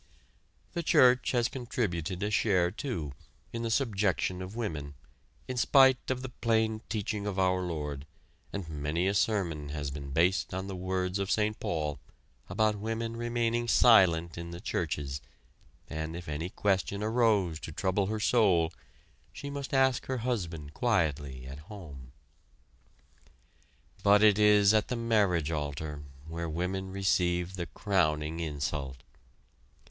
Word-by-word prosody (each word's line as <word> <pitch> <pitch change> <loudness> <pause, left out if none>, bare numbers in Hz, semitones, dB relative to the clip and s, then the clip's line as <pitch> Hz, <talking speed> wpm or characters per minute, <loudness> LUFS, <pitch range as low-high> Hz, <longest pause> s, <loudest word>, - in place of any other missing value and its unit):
The 170 - -1
church 125 -5 +5
has 120 -2 +2
contributed 100 - -3
a 105 - -1
share, 95 -4 +2
too, 90 - -4 0.4
in 115 - -3
the 115 - -2
subjection 100 - 0
of 95 +3 -7
women, 75 -11 -4 0.5
in 130 - -4
spite 130 +1 +5
of 130 0 -2
the 130 - -4
plain 110 -2 0
teaching 105 -1 -2
of 100 -2 -3
our 95 -1 +2
Lord, 75 -5 -4 0.4
and 100 -4 -5
many 75 +3 -2
a 100 - +2
sermon 85 -9 0
has 70 -1 -4
been 70 0 -7
based 85 +4 +1
on 95 0 -3
the 95 -1 -5
words 95 +1 -2
of 100 -1 -2
Saint 105 0 +1
Paul 75 -4 -2 0.5
about 105 +3 +1
women 115 +2 -3
remaining 120 0 -1
silent 85 -9 +5
in 85 0 -6
the 85 0 -7
churches, 70 -5 -3 0.7
and 80 +1 -4
if 85 0 -7
any 75 +4 -3
question 100 +1 0
arose 105 -7 +2
to 80 - -7
trouble 95 +4 0
her 110 +1 -2
soul, 95 -8 +3 0.6
she 140 - -7
must 140 -1 -5
ask 130 -2 +2
her 130 - -1
husband 85 -11 -3
quietly 75 - 0
at 70 +2 -8
home. 75 - -10 1.9
But 100 +1 +5
it 105 -1 +6
is 105 -1 +6
at 110 -1 +2
the 125 - -2
marriage 100 -9 +1
altar, 75 -1 -4 0.3
where 85 0 -4
women 90 +4 -2
receive 90 -2 0
the 85 -2 -4
crowning 80 -6 0
insult. 70 -4 -3
95 Hz, 140 wpm, -30 LUFS, 80-110 Hz, 1.9 s, it